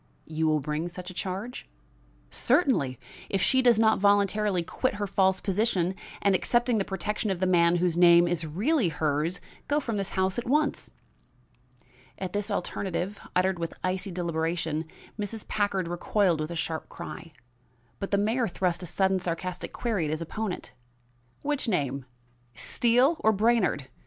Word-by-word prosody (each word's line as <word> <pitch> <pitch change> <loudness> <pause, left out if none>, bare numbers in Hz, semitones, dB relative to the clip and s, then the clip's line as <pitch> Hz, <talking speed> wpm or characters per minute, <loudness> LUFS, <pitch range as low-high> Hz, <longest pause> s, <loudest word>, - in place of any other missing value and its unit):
"You 160 0 -1
will 155 -1 +2
bring 150 +4 -2
such 180 +1 -6
a - - -11
charge?" 195 - -5 0.6
"Certainly, 240 - +2 0.3
if 195 - 0
she 260 +7 +3
does 240 -3 +5
not 220 0 +4
voluntarily 200 -1 +3
quit 255 +7 -1
her 205 0 -2
false 190 -1 +2
position, 195 -3 0 0.3
and, 200 - +4
accepting 240 +4 +2
the - - +1
protection 205 +3 -2
of 190 -3 -1
the 185 - +1
man 175 -1 +4
whose 175 -1 +1
name 175 0 +7
is 170 -1 -1
really 200 - +1
hers, 155 +3 -1 0.3
go 290 +1 +2
from 230 -7 -3
this 195 -1 -2
house 190 +4 +1
at 240 - -6
once." 295 +2 +1 1.3
At 185 -2 -5
this 205 +1 -1
alternative, 195 0 -3 0.2
uttered 185 0 +2
with 165 -1 -4
icy 185 +1 -1
deliberation, 165 -2 -2 0.3
Mrs. 210 +1 -4
Packard 200 -4 0
recoiled 175 0 +1
with 155 - -3
a 170 - -5
sharp 160 -1 -3
cry; 170 -1 -8 0.7
but 195 - -3
the 200 - +2
mayor 225 +4 +1
thrust 180 -2 -1
a 180 - -5
sudden 190 +2 +2
sarcastic 180 +1 -4
query 215 -9 -1
at - - -2
his 155 +1 -1
opponent: 190 +4 -4 0.7
"Which 290 -2 -1
name? 140 - -1 0.5
Steele 245 - +3
or 220 - +4
Brainard? 215 - +2
190 Hz, 160 wpm, -27 LUFS, 170-215 Hz, 1.3 s, name